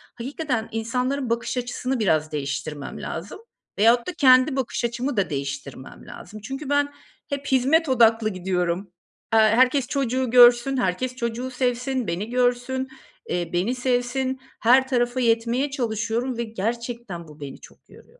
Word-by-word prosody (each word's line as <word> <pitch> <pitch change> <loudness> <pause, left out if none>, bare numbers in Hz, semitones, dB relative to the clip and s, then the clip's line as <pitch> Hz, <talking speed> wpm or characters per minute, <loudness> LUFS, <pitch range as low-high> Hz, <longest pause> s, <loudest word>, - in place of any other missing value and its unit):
hakikaten 250 -2 -3
insanların 250 +4 -2
bakış 235 +2 -2
açısını 250 +1 -2
biraz 155 -7 +1
değiştirmem 140 0 -4
lazım. 170 - -6 0.4
Veyahut 235 - +4
da 360 - -3
kendi 260 -2 +5
bakış 250 -2 -2
açımı 240 +1 -2
da 190 -4 +1
değiştirmem 140 -2 -6
lazım. 215 +4 -10
Çünkü 270 +6 -6
ben 285 0 +1 0.4
hep 280 0 -4
hizmet 275 +5 +3
odaklı 225 -3 +4
gidiyorum. 180 0 -2 0.4
Eee, 225 - +6
herkes 250 +4 +4
çocuğu 260 -3 -1
görsün, 245 +2 +6
herkes 245 +4 -1
çocuğu 240 +1 -3
sevsin, 250 -1 -1
beni 185 +7 -3
görsün, 250 +1 0 0.4
eee, 175 -1 -2
beni 190 +9 0
sevsin, 255 +1 -1 0.2
her 260 +3 +5
tarafa 245 -1 0
yetmeye 235 +4 +1
çalışıyorum 235 0 -2
ve 235 - -1
gerçekten 230 -4 -4
bu 150 0 -15
beni 140 -2 -8
çok - - -17
yoruyor. 485 +1 -19
240 Hz, 140 wpm, -24 LUFS, 215-260 Hz, 0.4 s, Eee